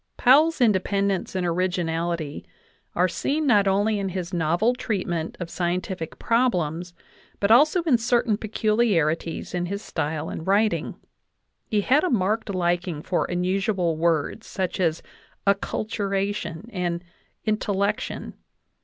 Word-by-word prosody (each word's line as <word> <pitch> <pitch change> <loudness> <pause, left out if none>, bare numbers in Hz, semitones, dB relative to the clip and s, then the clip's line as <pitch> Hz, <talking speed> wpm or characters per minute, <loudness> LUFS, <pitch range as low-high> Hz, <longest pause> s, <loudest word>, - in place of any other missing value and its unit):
Powell's 300 +6 +5
independence 200 -3 +1
and 185 -1 0
originality 170 -3 -1 0.5
are 180 +1 +3
seen 290 - -1
not 205 -7 +4
only 205 +2 +2
in 195 -1 -2
his 185 -1 -5
novel 175 +8 +2
treatment 180 -9 -3
of 175 - -4
scientific 180 -1 -3
problems, 180 -8 0 0.4
but 200 +1 +2
also 305 +9 +5
in 280 -8 +3
certain 235 -1 +2
peculiarities 205 -8 0
of 175 0 -1
his 200 +3 -4
style 150 0 -3
in - - -5
writing. 205 +4 +1 0.7
He 210 -1 +1
had 270 +8 +3
a 365 - +1
marked 215 -1 0
liking 175 -4 -1
for 180 - 0
unusual 180 -1 0
words, 165 +6 0
such 185 -2 -3
as 165 -3 0 0.4
"acculturation" 200 -2 -1
and 175 -2 -2 0.4
"intellection." 210 -1 -1
190 Hz, 120 wpm, -24 LUFS, 175-215 Hz, 0.7 s, Powell's